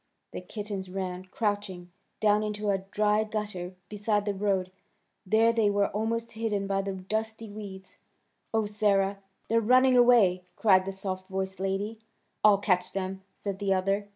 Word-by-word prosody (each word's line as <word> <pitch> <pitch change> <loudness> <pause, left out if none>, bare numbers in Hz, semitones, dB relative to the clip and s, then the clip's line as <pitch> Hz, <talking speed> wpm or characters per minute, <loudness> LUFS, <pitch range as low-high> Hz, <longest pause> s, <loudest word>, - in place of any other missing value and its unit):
The - - -6
kittens 200 0 -6
ran, 185 -1 -4
crouching, 200 -3 -3 0.3
down 210 0 +3
into 210 -1 -1
a 195 - +1
dry 210 +2 +1
gutter 210 -4 -4
beside 210 0 0
the 205 - 0
road. 190 -2 0 0.6
There 225 +3 +4
they 225 -3 +3
were 200 0 +2
almost 230 +2 -2
hidden 215 -3 -2
by 195 0 0
the 195 0 -3
dusty 220 +3 -4
weeds. 195 -2 -9 0.5
"Oh, 220 -1 +1
Sarah! 200 -2 +1 0.3
They're 230 +1 +3
running 255 +3 +5
away!" 230 -7 +5
cried 190 -4 +4
the 195 - -3
soft 190 -1 -5
voiced 190 0 -3
lady. 195 +3 -2 0.4
"I'll 210 -1 +7
catch 185 -2 0
them!" 190 0 -3
said 200 -2 -5
the 195 -2 +2
other. 195 +2 0
205 Hz, 155 wpm, -28 LUFS, 190-215 Hz, 0.6 s, I'll